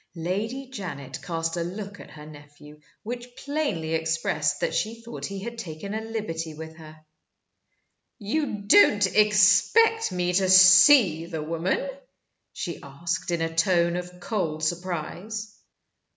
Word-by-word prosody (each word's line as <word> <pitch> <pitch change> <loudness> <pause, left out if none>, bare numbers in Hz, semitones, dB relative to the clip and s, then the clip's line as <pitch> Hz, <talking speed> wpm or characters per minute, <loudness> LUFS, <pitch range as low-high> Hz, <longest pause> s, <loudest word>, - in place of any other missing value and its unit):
Lady 205 +11 -3
Janet 150 - -7
cast 165 0 -3
a 170 - -1
look 200 +3 -7
at - - -12
her 150 0 -12
nephew 150 0 -15 0.2
which 245 +2 -7
plainly 280 - -3
expressed 160 0 -1
that - - -1
she 225 +1 -2
thought 230 +1 -7
he 200 - -6
had 235 +1 -7
taken 185 0 -7
a 220 - -3
liberty 185 -8 -5
with 160 +1 -9
her. 155 -1 -14 1.1
"You 225 0 -2
don't 205 0 +5
expect 210 - +4
me 180 0 -1
to 190 +1 +2
see 185 - +7
the 160 -3 -5
woman?" 170 - -2 0.6
she 170 - -6
asked, 170 +7 -4
in 170 -1 -1
a 165 0 -4
tone 170 0 +2
of 180 0 -7
cold 170 -6 -3
surprise. 185 +6 -4
180 Hz, 135 wpm, -25 LUFS, 160-215 Hz, 1.1 s, see